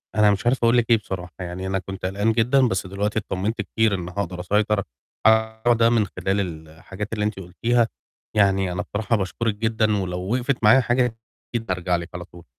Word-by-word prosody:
أنا 105 -1 +5
مش 100 +4 -2
عارف، 125 +2 +3
أقول 115 +1 +5
لِك 120 0 +1
إيه 115 - +6
بصراحة، 90 -4 -6
يعني 90 +1 -5
أنا 95 0 0
كنت 95 +1 -7
قلقان 100 +4 +1
جدًا، 125 +3 +3
بس 95 -2 -2
دلوقتي 105 +3 -1
اتطمِنت 105 +2 -2
كتير 110 0 +1
إن 90 -1 -5
هاقدر 90 -1 -4
أسيطر 105 +2 +1 0.4
على 110 0 +5
الموضوع 120 - +6
ده 115 0 +4
من 115 -3 +3
خلال 95 +2 -2 0.3
الحاجات 95 +7 -7
اللي 105 -1 -1
أنتِ 105 -2 -2
قُلتيها، 115 +6 +1 0.5
يعني 95 -2 +3
أنا 90 - -2
بصراحة 110 +3 -1
باشكُرِك 105 +3 -2
جدًا، 110 -1 +1
ولو 90 -1 -3
وِقِفت 125 -1 -1
معايا 110 +5 +7
حاجة، 120 -1 +1 0.4
أكيد 115 -1 -2
بارجع 90 -2 0
لِك 85 +1 -4
على 90 0 -6
طول. 85 -1 -15
105 Hz, 200 wpm, -23 LUFS, 95-115 Hz, 0.5 s, معايا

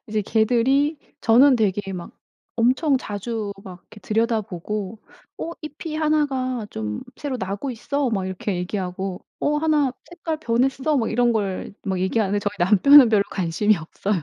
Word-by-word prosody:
이제 215 0 -1
걔들이 250 +8 +2 0.2
저는 255 +5 +6
되게 205 -3 0
막 175 -2 -7 0.4
엄청 260 +5 +3
자주 210 -2 -4
막 185 -2 -10
이렇게 210 - -16
들여다보고 215 -2 -2 0.4
"어 330 - -4
잎이 305 +1 -6
하나가 270 -7 0
좀 105 -1 -4
새로 280 -3 -4
나고 200 +5 -4
있어." 270 +4 -2
막 195 -4 -1
이렇게 190 +1 -3
얘기하고 185 0 -4 0.2
"어 295 +1 +1
하나 300 -4 +2 0.2
색깔 335 -2 -4
변했어." 265 +2 +1
뭐 230 -4 +1
이런 240 +1 +2
걸 195 -3 -2
막 190 -2 -1
얘기하는데 200 +1 +1
저희 205 0 -2
남편은 225 +9 +7
별로 210 -3 +4
관심이 190 +4 +1
없어요. 175 +3 -3
225 Hz, 315 characters per minute, -23 LUFS, 195-270 Hz, 0.4 s, 남편은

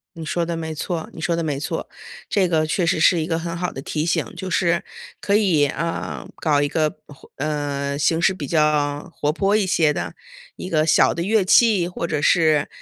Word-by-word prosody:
你 165 -1 -7
说 170 +2 -1
得 170 -1 -3
没 160 -1 -4
错， 165 +2 -4
你 160 - -9
说 170 0 0
得 165 - -2
没 145 -3 -2
错。 165 +2 -4 0.4
这 190 -3 +2
个 160 -2 +1
确 170 +3 0
实 160 - +1
是 165 +1 +4
一 155 - -3
个 165 -2 0
很 170 0 -4
好 180 +1 -3
的 135 - -7
提 150 +2 -3
醒， 165 - 0
就 190 - -5
是 170 -1 +1 0.4
可 200 - +1
以， 175 -9 +3
呃， 165 +4 -4
搞 150 -3 +1
一 145 - +1
个， 155 +1 +1 0.2
活 145 - -16
呃， 140 -1 -2
形 160 +3 +2
式 190 +2 +3
比 150 -7 -6
较 150 -2 +1
活 150 0 0
泼 195 +5 +1
一 205 -3 +1
些 160 -4 +2
的 - - -5 0.4
一 185 - -7
个 155 -1 +1
小 - - +4
的 170 - -4
乐 205 +1 +2
器， 205 -4 +4
或 170 -1 -4
者 150 -2 -1
是 155 -2 +3
165 Hz, 235 characters per minute, -21 LUFS, 150-175 Hz, 0.4 s, 是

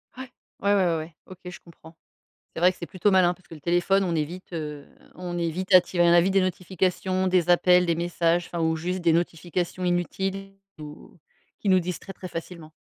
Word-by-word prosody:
Ouais. 260 0 -8 0.3
Ouais, 200 +1 +2
ouais, 195 -2 +3
ouais, 170 -2 +1
ouais, 160 +1 -8
OK, 185 -1 -13
je 180 - -8
comprends. 165 -1 -17 0.6
C'est - - -6
vrai 180 +2 +5
que - - -17
c'est 170 - -6
plutôt 190 +4 0
malin, 185 -2 +4
parce 180 0 -24
que - - -12
le 155 - -14
téléphone, 175 +4 +2
on 175 -2 -1
est 155 - +1
vite, 180 +5 -11
heu, 150 -3 -6 0.3
on 175 -1 -5
est 170 -1 0
vite 185 +4 -3
attirés 180 -1 +5
on 170 - +5
a 175 - +6
vite 190 +2 0
des 195 - +4
notifications, 185 +1 -1
des 180 -2 +1
appels, 180 0 +5
des 170 -1 +1
messages, 170 0 0
enfin, 170 - -4
ou 160 0 +1
juste 180 +3 -3
des 170 -2 +3
notifications 175 +2 -2
inutiles 195 +2 -2 0.3
ou 150 +3 -12 0.4
qui 205 - -1
nous 185 -1 +5
distraient 180 +2 -6
très 185 - -9
facilement. 165 -2 -8
175 Hz, 220 wpm, -25 LUFS, 170-185 Hz, 0.6 s, a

